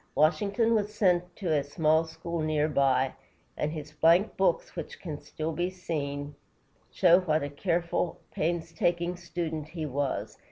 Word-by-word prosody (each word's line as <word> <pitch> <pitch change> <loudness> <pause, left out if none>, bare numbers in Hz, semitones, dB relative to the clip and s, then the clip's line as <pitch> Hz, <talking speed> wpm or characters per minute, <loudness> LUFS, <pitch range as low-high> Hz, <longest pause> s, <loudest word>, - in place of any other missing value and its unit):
Washington 200 +8 +3
was 210 -1 +1
sent 180 -3 +2
to 175 -5 -1
a 145 -2 +2
small 155 +3 +2
school 165 +1 -5
near 155 -1 +1
by, 135 -3 +2 0.4
and 150 - -1
his 155 -2 -6
blank 170 +7 +4
books, 185 -3 +1
which 165 -4 -6
can 155 -5 -6
still 155 +1 -4
be 175 +3 -1
seen, 145 -6 -4 0.6
show 175 -1 +5
what 155 -4 +1
a 145 - -3
careful, 170 +3 -1
painstaking 170 +1 0
student 165 -3 -4
he 160 -1 -5
was. 130 -7 -2
165 Hz, 150 wpm, -29 LUFS, 150-175 Hz, 0.6 s, show